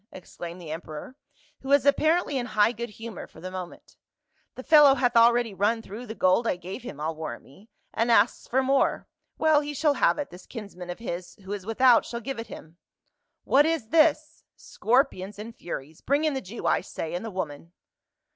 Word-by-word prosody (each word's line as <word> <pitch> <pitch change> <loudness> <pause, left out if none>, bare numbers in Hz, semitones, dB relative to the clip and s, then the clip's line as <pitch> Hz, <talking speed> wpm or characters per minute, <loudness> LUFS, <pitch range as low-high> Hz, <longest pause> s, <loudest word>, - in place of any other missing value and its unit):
exclaimed 175 -1 -9
the 165 -3 -8
emperor, 160 +8 -7 0.4
who 270 - -9
was 280 -1 +4
apparently 310 +2 +2
in 245 -2 -1
high 210 0 +3
good 235 0 -6
humor 225 -1 -8
for - - -16
the 185 +3 -7
moment. 185 -2 -9 0.3
" 315 0 -44
The 255 - -8
fellow 295 -3 +7
hath 245 -2 +1
already 235 -1 +4
run 215 +4 0
through 225 +5 -9
the 220 - -6
gold 185 +5 +2
I - - +1
gave 180 +7 -8
him 155 - -9
I'll 160 +2 -2
warrant 155 -7 -6
me, 195 +12 -19 0.2
and 230 +2 0
asks - - +3
for 265 +2 +1
more. 270 +1 +1 0.3
Well, 310 -2 +4
he 295 0 -5
shall 295 +1 +2
have - - +2
it, 290 - -4
this 180 +1 -13
kinsman 200 -6 -9
of 175 - -5
his 180 -6 -6
who 195 +2 -5
is 200 -1 -7
without 240 +1 +5
shall 235 - -6
give 255 +1 -5
it 230 - -6
him. 160 +3 -12 0.3
— - - -56 0.3
What 290 +3 +4
is 320 -9 -1
this! 310 0 +2
scor 250 +5 +2
pions 195 -2 -9
and 225 +2 -8
furies! 155 -2 -7
Bring 285 +3 +1
in 310 -2 +1
the 265 - -3
Jew, 205 +5 -8
I - - +2
say, 160 - -6
and 175 - -3
the 225 - -5
woman." 170 -4 -6
230 Hz, 215 wpm, -26 LUFS, 185-270 Hz, 0.4 s, fellow